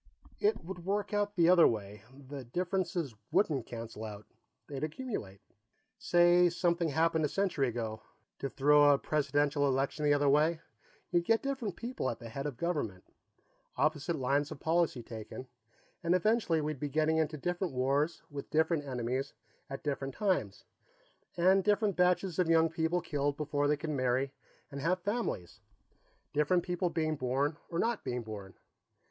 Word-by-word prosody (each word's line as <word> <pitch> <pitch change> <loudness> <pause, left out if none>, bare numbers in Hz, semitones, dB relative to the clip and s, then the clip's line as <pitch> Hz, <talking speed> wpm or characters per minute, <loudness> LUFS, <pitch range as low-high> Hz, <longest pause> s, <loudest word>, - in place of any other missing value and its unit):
"It 420 +2 +1
would 180 -1 -7
work 205 +3 -1
out 205 0 0
the 170 -2 +4
other 175 -1 +7
way. 105 -2 -3 0.3
The 140 -1 -6
differences 175 - -2 0.2
wouldn't 155 - +1
cancel 115 -2 -7
out; 105 -1 -7 0.4
they'd 140 0 -6
accumulate. 155 - -5 0.6
Say 175 0 +5
something 170 -1 +1
happened 160 +2 +2
a 150 - +1
century 185 -9 0
ago, 110 -2 -4 0.4
to 135 - -3
throw 145 +2 +5
a 140 - +5
presidential 145 0 +1
election 135 +3 0
the 145 -1 +4
other 145 0 +2
way. 155 +4 +3 0.5
You'd 175 -1 +2
get 225 +2 +2
different 265 -9 -2
people 240 - -3
at 115 - -4
the 115 -1 -9
head 135 +6 -4
of 135 -5 -6
the - - -25
government, 145 - -2 0.7
opposite 155 +2 +1
lines 140 +1 +1
of - - -8
policy 160 -6 +1
taken, 115 +3 -8 0.6
and 175 0 +2
eventually 185 -4 +2
we'd 150 -2 -3
be 145 - -3
getting 155 +2 +2
into 155 -1 0
different 175 +1 -2
wars 140 +5 +1
with 145 -1 -7
different 160 0 +2
enemies 130 0 -2 0.4
at 135 - -6
different 135 -2 -3
times, 200 -3 0 0.7
and 190 +3 +4
different 205 -1 +2
batches 180 0 +2
of 175 -2 +2
young 165 -1 +4
men 165 +2 +1
killed 145 -1 -1
before 145 -1 0
they 150 0 +2
could 155 +1 -4
marry 130 0 0 0.4
and 140 0 -6
have 175 +5 +2
families 205 - -3 0.7
different 150 +4 +2
people 180 0 -1
being 155 -1 0
born 135 +3 0
or 165 - -3
not 230 +3 0
being 125 -1 -3
born. 100 -4 -8
155 Hz, 165 wpm, -32 LUFS, 135-175 Hz, 0.7 s, other